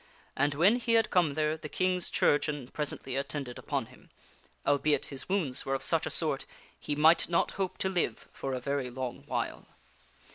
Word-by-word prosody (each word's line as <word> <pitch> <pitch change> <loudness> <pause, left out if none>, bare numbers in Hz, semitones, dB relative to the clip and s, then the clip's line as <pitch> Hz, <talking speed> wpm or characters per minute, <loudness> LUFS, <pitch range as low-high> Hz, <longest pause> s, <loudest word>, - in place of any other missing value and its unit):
And 145 +1 +1
when 190 +10 +5
he 235 -1 0
had 225 -1 +3
come 170 -7 +3
there 155 0 +1
the 155 -1 -8
King's 185 +1 0
chirurgeon 145 -3 +1
presently 140 -3 -4
attended 140 -2 -3
upon - - -2
him - - -19 0.6
albeit 145 0 +2
his 135 - -6
wounds 160 -10 0
were 135 - -1
of 135 - -4
such - - +2
a - - -1
sort - - 0 0.3
he 145 - -2
might 160 +4 +5
not 170 - +2
hope 190 -2 -3
to - - 0
live 175 -12 -1
for 135 -1 -3
a - - -2
very 140 0 -2
long 125 0 -5
while. - - -3
145 Hz, 185 wpm, -30 LUFS, 135-175 Hz, 0.6 s, when